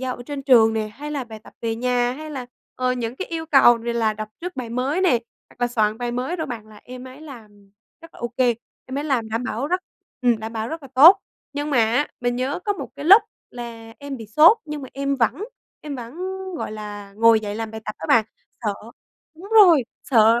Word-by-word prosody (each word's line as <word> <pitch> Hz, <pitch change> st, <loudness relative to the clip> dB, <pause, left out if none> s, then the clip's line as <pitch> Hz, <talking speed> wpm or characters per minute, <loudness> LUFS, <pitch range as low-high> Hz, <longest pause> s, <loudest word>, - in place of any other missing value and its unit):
giao 260 Hz, -1 st, -3 dB
ở -, -, -9 dB
trên 285 Hz, -2 st, -5 dB
trường 235 Hz, -5 st, +6 dB
nè, 215 Hz, -1 st, -1 dB
hay 285 Hz, +8 st, -8 dB
là 280 Hz, -4 st, -3 dB
bài 220 Hz, -2 st, -10 dB
tập -, -, -15 dB
về 225 Hz, -1 st, -1 dB
nhà, 245 Hz, 0 st, +1 dB
hay 310 Hz, +3 st, -8 dB
là, 260 Hz, -4 st, -6 dB, 0.3 s
ờ, 255 Hz, 0 st, 0 dB
những 240 Hz, 0 st, -4 dB
cái 385 Hz, -, -4 dB
yêu 325 Hz, -1 st, -4 dB
cầu 255 Hz, -6 st, +6 dB
về 235 Hz, 0 st, -2 dB
là 225 Hz, -2 st, +1 dB
đọc 215 Hz, 0 st, -6 dB
trước 355 Hz, -1 st, -6 dB
bài 240 Hz, -3 st, -5 dB
mới 265 Hz, +8 st, -1 dB
nè, 375 Hz, -2 st, +4 dB, 0.4 s
hoặc -, -, -21 dB
là 245 Hz, -, +3 dB
soạn 215 Hz, -1 st, 0 dB
bài 245 Hz, 0 st, -2 dB
mới 260 Hz, +9 st, -2 dB
rồi 320 Hz, -, -3 dB
bạn, 225 Hz, -3 st, -7 dB
là 215 Hz, -1 st, -15 dB
em 250 Hz, 0 st, -9 dB
ấy 260 Hz, +4 st, -13 dB
làm 210 Hz, -9 st, -13 dB, 0.3 s
rất 330 Hz, -, -14 dB
là -, -, -14 dB
ô 240 Hz, -, -2 dB
kê. 245 Hz, -2 st, +3 dB, 0.3 s
Em 260 Hz, +2 st, -4 dB
ấy 295 Hz, -, -3 dB
làm 245 Hz, -7 st, 0 dB
đảm 225 Hz, +3 st, -2 dB
bảo 255 Hz, +1 st, -2 dB
rất 365 Hz, +4 st, 0 dB, 0.4 s
ừm, 240 Hz, -3 st, +3 dB
đảm 220 Hz, +1 st, -6 dB
bảo 220 Hz, +1 st, -3 dB
rất 320 Hz, -1 st, -6 dB
là 275 Hz, -, -11 dB
tốt. 330 Hz, +9 st, +9 dB, 0.3 s
Nhưng 290 Hz, +1 st, -3 dB
mà 260 Hz, -, +2 dB
á, 230 Hz, +6 st, +2 dB
mình 245 Hz, 0 st, 0 dB
nhớ 260 Hz, +5 st, -1 dB
có 410 Hz, -, +1 dB
một 395 Hz, -, -7 dB
cái 285 Hz, -, -7 dB
lúc 400 Hz, +7 st, +8 dB, 0.3 s
là 230 Hz, -2 st, -9 dB
em 285 Hz, -1 st, -6 dB
bị 225 Hz, -3 st, -9 dB
sốt 320 Hz, -, +6 dB
nhưng 300 Hz, -2 st, -6 dB
mà 265 Hz, -, -8 dB
em 275 Hz, 0 st, -1 dB
vẫn 260 Hz, -, 0 dB, 0.4 s
em 290 Hz, -3 st, -6 dB
vẫn, 240 Hz, +2 st, -8 dB, 0.4 s
gọi -, -, -4 dB
là, 205 Hz, -2 st, -8 dB
ngồi 230 Hz, 0 st, +5 dB
dậy 205 Hz, -1 st, -5 dB
làm 225 Hz, -1 st, -4 dB
bài 220 Hz, 0 st, -7 dB
tập 215 Hz, -, -5 dB
đó 160 Hz, -, -8 dB
bạn. 225 Hz, -2 st, +5 dB, 0.4 s
Sợ 210 Hz, -3 st, -1 dB, 0.6 s
đúng 370 Hz, +5 st, -12 dB
rồi, 350 Hz, -, +7 dB, 0.2 s
sợ 230 Hz, -1 st, +5 dB
250 Hz, 245 wpm, -22 LUFS, 225-290 Hz, 0.6 s, tốt